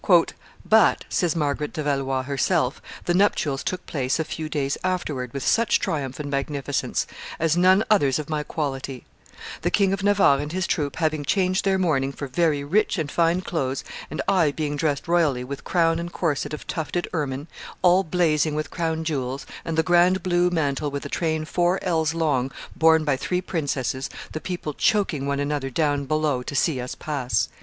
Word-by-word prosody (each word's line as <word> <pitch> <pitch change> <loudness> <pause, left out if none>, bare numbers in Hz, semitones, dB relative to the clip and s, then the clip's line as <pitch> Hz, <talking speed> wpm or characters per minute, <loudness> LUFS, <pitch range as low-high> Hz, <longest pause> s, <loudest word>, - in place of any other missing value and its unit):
"But," 220 -1 +4
says 175 -3 +1
Marguerite 150 -1 -1
de 155 - -3
Valois 135 -2 0
herself, 140 +1 0 0.2
"the 175 - +1
nuptials 160 -7 +2
took 185 0 -3
place 130 -3 -1
a 160 - 0
few 155 0 -5
days 140 -2 -1
afterwards 155 -9 -2
with 140 +1 -4
such 230 0 +3
triumph 135 -4 -3
and 150 - -4
magnificence 140 -1 -1 0.3
as 165 0 +1
none 185 +4 +5
others 145 -12 +3
of 155 -2 -5
my 155 -1 -1
quality; 135 -4 -4 0.6
the - - +1
King 195 -1 +2
of 195 - -2
Navarre 195 -8 +4
and 145 +1 -4
his 185 +1 0
troop 145 -7 -1
having 155 -2 0
changed 185 +4 +1
their 195 -1 +3
mourning 145 -7 +1
for 140 - -6
very 145 +1 +1
rich 200 +9 +1
and 155 -4 -2
fine 170 +1 +2
clothes, 140 -7 -2 0.3
and - - -3
I 175 -6 +4
being 145 0 -2
dressed 145 +1 -1
royally, 160 -7 +2
with 140 +2 -7
crown 165 -2 +2
and 170 0 -5
corset 155 -7 -1
of 150 - -6
tufted 175 +2 -3
ermine, 140 -3 -2 0.4
all 180 +1 +5
blazing 155 -3 +1
with 155 0 -3
crown 160 -2 -1
jewels, 135 -4 -3 0.2
and 165 -1 -3
the 160 - +4
grand 175 +2 +4
blue 175 -1 +2
mantle 150 -4 0
with 140 0 -5
a - - -5
train 160 -2 -1
four 175 +3 +1
ells 160 -3 +1
long 145 -6 +1 0.3
borne 160 -2 +5
by 145 -3 +2
three 180 +6 -1
princesses, 140 - -2 0.2
the 155 - -5
people 175 -5 -4
choking 160 -7 +1
one 140 0 0
another 145 -1 -1
down 145 0 0
below 155 -3 0
to 145 +3 -6
see 135 -1 +1
us 125 - -5
pass." 140 -5 -1
155 Hz, 185 wpm, -24 LUFS, 140-175 Hz, 0.6 s, none